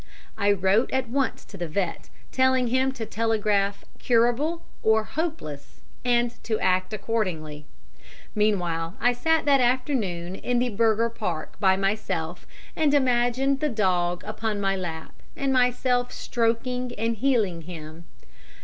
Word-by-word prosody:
I 205 -1 +2
wrote 200 +4 +2
at 260 -2 -1
once 270 +2 -1
to 200 - -11
the 175 -2 -3
vet, 165 -4 -3 0.2
telling 260 -1 +3
him 260 +2 +2
to 230 -4 -5
telegraph 210 -3 0
"Curable" 245 +8 +2 0.2
or 220 0 +3
"Hopeless," 290 - -5 0.2
and 240 -1 +1
to 220 -2 -1
act 185 +1 +1
accordingly. 180 -9 -3 0.7
Meanwhile, 180 -5 0
I 245 +1 +3
sat 320 +6 +1
that 280 -2 +5
afternoon 235 -9 0
in 245 +5 -1
the 245 0 +1
Bürgerpark 220 -6 0
by 190 -2 +4
myself 195 -4 -2 0.3
and 295 -2 +3
imagined 260 +1 +2
the 300 - 0
dog 180 -6 0
upon 215 0 -3
my 195 -1 +1
lap, 165 -4 -6 0.2
and 275 -1 0
myself 250 0 +2
stroking 245 +1 -1
and 230 +1 -1
healing 210 -9 +1
him. 160 -1 -9
225 Hz, 130 wpm, -25 LUFS, 185-250 Hz, 0.7 s, that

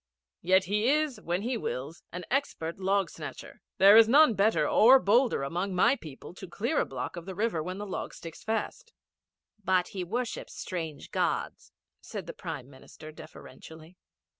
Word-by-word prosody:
Yet 185 +2 +4
he 210 +5 0
is, 295 -6 0
when 175 +2 -2
he 245 +1 -1
wills, 145 - -5
an 180 0 -7
expert 195 - -2
log 195 +1 0
snatcher. - - -9 0.2
There 200 +2 +8
is 225 0 +7
none 285 -1 +6
better 210 +2 +2
or 250 +5 +7
bolder 235 - +2
among 180 +7 -3
my 235 +9 +4
people 155 - -11
to 190 +1 -10
clear 235 - -1
a - - -1
block 130 +5 -5
of 170 +1 -9
the 190 - -6
river 210 -5 -1
when 180 +4 -5
the 205 - -5
logs 190 - -6
stick 165 -1 -9
fast.' 345 - -4 0.7
'But 185 -1 +1
he 190 -2 -5
worships 235 +7 -4
strange 165 -6 -6
Gods,' - - -2 0.3
said - - -7
the - - -7
Prime 125 - -7
Minister 140 +3 -13
deferentially. 160 +2 -13
190 Hz, 170 wpm, -28 LUFS, 170-225 Hz, 0.7 s, There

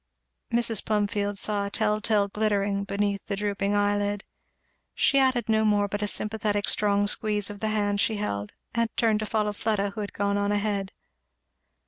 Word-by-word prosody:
Mrs. 230 -2 +2
Plumfield 205 -1 0
saw 200 0 0
a - - -5
tell 210 0 0
tale 210 -2 +2
glittering 200 -1 0
beneath 200 0 -1
the 200 - -1
drooping 200 0 -1
eye 205 0 +2
lid. 205 0 -2 0.7
She 275 - +3
added 255 -4 +2
no 220 -1 +3
more 205 -1 +3
but 205 +1 -4
a 210 - 0
sympathetic 210 -1 0
strong 205 -1 +2
squeeze 210 -1 +1
of 205 - -9
the 220 - -1
hand 205 -1 0
she 220 - +1
held, 105 - -3 0.2
and 230 -1 +1
turned 220 -2 +2
to 215 - -3
follow 210 -1 0
Fleda 205 -1 -1
who 215 - -6
had 205 - -5
gone 200 0 0
on 200 0 0
ahead. 205 -2 -1
205 Hz, 180 wpm, -26 LUFS, 200-215 Hz, 0.7 s, She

